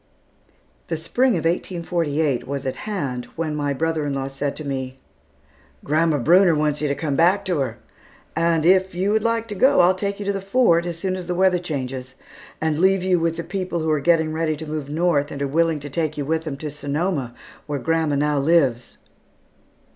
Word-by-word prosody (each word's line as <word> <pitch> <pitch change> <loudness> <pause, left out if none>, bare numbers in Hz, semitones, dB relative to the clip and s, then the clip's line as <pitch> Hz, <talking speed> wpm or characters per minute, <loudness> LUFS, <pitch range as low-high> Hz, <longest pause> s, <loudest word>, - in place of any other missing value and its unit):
The 165 - -2
Spring 245 +10 +1
of 165 -4 -2
1848 165 -5 -1
was 140 0 -4
at 130 - -2
hand 135 -12 -3
when 160 -2 -2
my 145 -1 -1
brother 160 +2 -1
in 140 - -2
law 135 0 -3
said 140 +1 -3
to 155 - -7
me, 130 -1 -4 0.9
"Grandma 155 +1 +2
Brunner 170 +5 +5
wants 150 -1 0
you 150 - +1
to 140 - 0
come 145 -2 -2
back 185 +6 +3
to 180 -5 0
her; 135 - -2 0.6
and 165 -1 +2
if, 185 0 +3
you 190 +3 0
would 220 +1 +2
like 230 0 0
to - - -3
go, 260 +6 +4
I'll 180 +1 +5
take 200 +1 -3
you 205 - -5
to 200 - 0
the 195 - -3
Fort, 195 -5 +3
as 170 -1 -4
soon 185 +2 -2
as 180 -2 -6
the 180 - -1
weather 185 0 +3
changes, 130 -6 -5 0.4
and 155 -1 0
leave 190 +1 +3
you 185 -1 +2
with 165 0 0
the 170 - -3
people 180 -1 -3
who 160 0 0
are 155 - +2
getting 160 0 +2
ready 160 -1 -1
to 160 - -7
move 150 -2 -5
north 150 -2 +1
and 140 - -6
are 140 - -1
willing 165 +2 +1
to 145 - -7
take 155 0 -1
you 145 - -2
with 160 +2 -1
them 145 -3 -4
to 150 +1 -5
Sonoma, 145 -3 -2 0.3
where 145 -1 -2
grandma 160 +1 0
now 145 0 +1
lives." 135 -6 +1
160 Hz, 210 wpm, -22 LUFS, 145-180 Hz, 0.9 s, Brunner